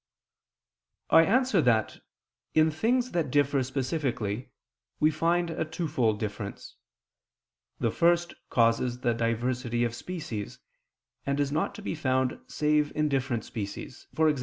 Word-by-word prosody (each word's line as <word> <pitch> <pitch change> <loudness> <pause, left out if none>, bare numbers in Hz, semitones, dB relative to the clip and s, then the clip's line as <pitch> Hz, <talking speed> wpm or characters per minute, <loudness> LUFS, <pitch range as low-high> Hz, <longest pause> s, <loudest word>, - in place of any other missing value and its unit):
I 165 0 +8
answer 250 -4 +3
that, 115 -5 +1 0.6
In 155 0 +5
things 240 - +1
that 170 -5 0
differ 140 0 +2
specifically 130 -4 -2 0.5
we 155 +1 +4
find 170 +2 +1
a - - -1
twofold 150 - -1
difference: 105 -1 -6 1.0
the - - +1
first 170 0 +2 0.2
causes 120 +1 +2
the 120 -1 +2
diversity 120 +1 -1
of 120 -1 0
species, 120 - -5 0.7
and 140 +1 -1
is 140 -1 +1
not 155 +2 -1
to - - -9
be - - -2
found 130 -4 0
save 150 -1 +1
in 150 0 +1
different 130 -4 -1
species, 105 +5 -7
e.g. 155 -2 +4
140 Hz, 130 wpm, -28 LUFS, 120-160 Hz, 1.0 s, I